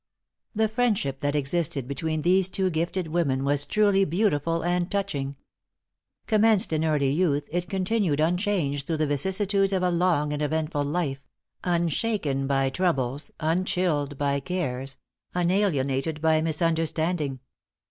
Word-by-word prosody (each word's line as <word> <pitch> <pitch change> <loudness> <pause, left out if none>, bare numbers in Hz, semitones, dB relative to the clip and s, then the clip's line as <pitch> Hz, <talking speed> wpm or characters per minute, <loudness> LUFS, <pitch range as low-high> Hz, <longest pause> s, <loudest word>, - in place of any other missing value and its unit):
The 220 +1 +2
friendship 215 - 0
that 145 +1 -1
existed 145 -2 -1
between 155 +3 -2
these 185 +1 +4
two 190 -1 +1
gifted 170 +1 -2
women 145 -5 0
was 145 0 0
truly 205 -2 +3
beautiful 165 -3 0
and 175 +1 0
touching. 150 -9 -2 0.9
Commenced 215 -5 +3
in 155 0 +1
early 150 -4 +2
youth, 145 -2 +1
it 175 +1 -2
continued 190 -5 0
unchanged 165 -4 0
through 165 - -1
the 155 - +1
vicissitudes 190 +7 +1
of 185 -1 +1
a 180 - +2
long 170 -4 +1
and 150 - -3
eventful 150 -1 -1
life 145 -3 -2 0.4
unshaken 170 -4 0
by 135 -1 +1
troubles, 140 -4 -1
unchilled 160 -3 0
by 140 0 0
cares, 135 -5 -3 0.4
unalienated 160 -6 0
by 160 0 +3
misunderstanding. 160 -2 0
160 Hz, 130 wpm, -26 LUFS, 145-185 Hz, 0.9 s, these